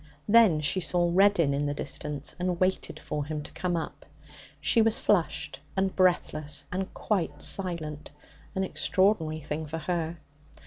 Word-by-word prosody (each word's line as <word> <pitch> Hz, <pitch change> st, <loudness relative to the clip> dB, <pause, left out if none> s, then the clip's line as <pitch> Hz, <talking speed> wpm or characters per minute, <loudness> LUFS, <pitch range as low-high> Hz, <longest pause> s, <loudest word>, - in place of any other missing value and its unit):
Then 210 Hz, -8 st, +6 dB
she 150 Hz, +5 st, +2 dB
saw 175 Hz, 0 st, +1 dB
Reddin 185 Hz, -6 st, +4 dB
in 145 Hz, +1 st, 0 dB
the 145 Hz, -, -2 dB
distance, 145 Hz, 0 st, -4 dB
and 180 Hz, -1 st, -1 dB
waited 185 Hz, +1 st, 0 dB
for 150 Hz, -1 st, -4 dB
him 150 Hz, 0 st, -4 dB
to -, -, -10 dB
come 175 Hz, -2 st, -2 dB
up. 165 Hz, -, -6 dB, 0.5 s
She 230 Hz, -, +3 dB
was 225 Hz, 0 st, +3 dB
flushed 180 Hz, -6 st, 0 dB, 0.2 s
and 190 Hz, 0 st, 0 dB
breathless 155 Hz, -5 st, +1 dB
and 190 Hz, +1 st, -3 dB
quite 165 Hz, -8 st, -1 dB
silent 165 Hz, -6 st, -1 dB, 0.5 s
an 190 Hz, -, 0 dB
extraordinary 185 Hz, -5 st, +1 dB
thing 150 Hz, +2 st, -4 dB
for 160 Hz, +2 st, -4 dB
her. 170 Hz, 0 st, -2 dB
170 Hz, 150 wpm, -28 LUFS, 150-190 Hz, 0.5 s, Then